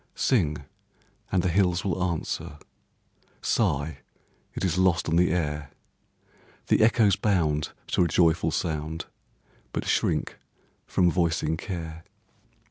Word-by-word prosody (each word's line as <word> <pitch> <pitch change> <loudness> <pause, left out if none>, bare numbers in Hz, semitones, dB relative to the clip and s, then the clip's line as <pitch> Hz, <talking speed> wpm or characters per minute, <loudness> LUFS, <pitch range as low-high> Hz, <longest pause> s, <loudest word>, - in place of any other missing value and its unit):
Sing, 80 - +2 0.7
and 90 -2 +2
the 90 - +1
hills 90 0 +2
will 95 -2 0
answer; 85 -4 -3 0.8
Sigh, 70 +3 0 0.6
it - - -2
is 90 0 0
lost 95 -2 +2
on 80 - +1
the 90 +1 +4
air; 75 -4 -2 1.0
The - - +4
echoes 110 -3 +4
bound 80 -8 0 0.2
to - - +3
a - - +1
joyful 80 0 +3
sound, 80 -1 -3 0.7
But - - -3
shrink - - 0 0.5
from 90 -2 +3
voicing 80 -3 +1
care. 80 -2 -6
85 Hz, 120 wpm, -26 LUFS, 80-90 Hz, 1.0 s, the